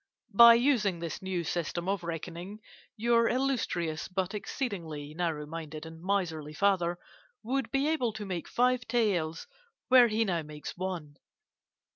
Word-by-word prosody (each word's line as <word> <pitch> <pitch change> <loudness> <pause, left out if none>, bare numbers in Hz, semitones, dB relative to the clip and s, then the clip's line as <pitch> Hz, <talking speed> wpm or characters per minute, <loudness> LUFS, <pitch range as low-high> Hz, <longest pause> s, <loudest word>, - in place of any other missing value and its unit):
By 235 +2 +10
using 235 -7 +2
this 170 -2 -5
new 190 -2 -2
system 170 +1 -3
of 195 -2 -1
reckoning, 170 +4 -6 0.4
your 230 +1 +3
illustrious 230 -12 -1
but 190 +1 -2
exceedingly 170 - -4
narrow 160 -3 -2
minded 155 0 -7
and 160 0 -10
miserly 165 -6 -1
father 180 -2 +2 0.5
would 265 +4 -1
be 275 +1 +1
able 300 -7 +1
to 210 -1 -6
make 180 -4 -4
five 250 0 +1
taels 180 -9 0 0.4
where 250 -2 +8
he 225 0 +1
now 175 -4 0
makes 150 -1 -8
one. 175 -6 -5
185 Hz, 140 wpm, -30 LUFS, 165-230 Hz, 0.5 s, By